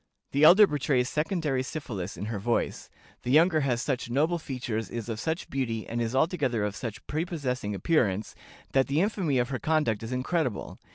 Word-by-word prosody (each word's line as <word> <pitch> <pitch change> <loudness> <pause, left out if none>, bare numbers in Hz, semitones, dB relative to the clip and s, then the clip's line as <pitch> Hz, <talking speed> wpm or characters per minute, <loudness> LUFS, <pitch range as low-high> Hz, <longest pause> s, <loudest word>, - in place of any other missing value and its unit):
The 140 +2 +2
elder 195 +6 +9
betrays 140 -6 0
secondary 150 -4 0
syphilis 110 - -5
in 100 - -4
her 110 -1 -3
voice; 115 +4 -1 0.3
the - - -5
younger 160 +4 +5
has 125 -5 0
such 130 -4 -2
noble 155 +7 +1
features, 120 -8 -4
is 120 -1 -5
of 110 -1 -3
such 160 - -2
beauty, 115 -5 -2
and 120 +1 -2
is 115 +2 -2
altogether 135 - +1
of 105 -1 -2
such 115 -2 -6
prepossessing 140 - -2
appearance, 105 - +1 0.4
that 135 -1 +3
the 140 +3 +1
infamy 185 -7 +1
of 120 0 +1
her 130 -2 -3
conduct 150 -9 +1
is 115 +2 -6
incredible. 130 - -2
130 Hz, 180 wpm, -28 LUFS, 115-155 Hz, 0.4 s, elder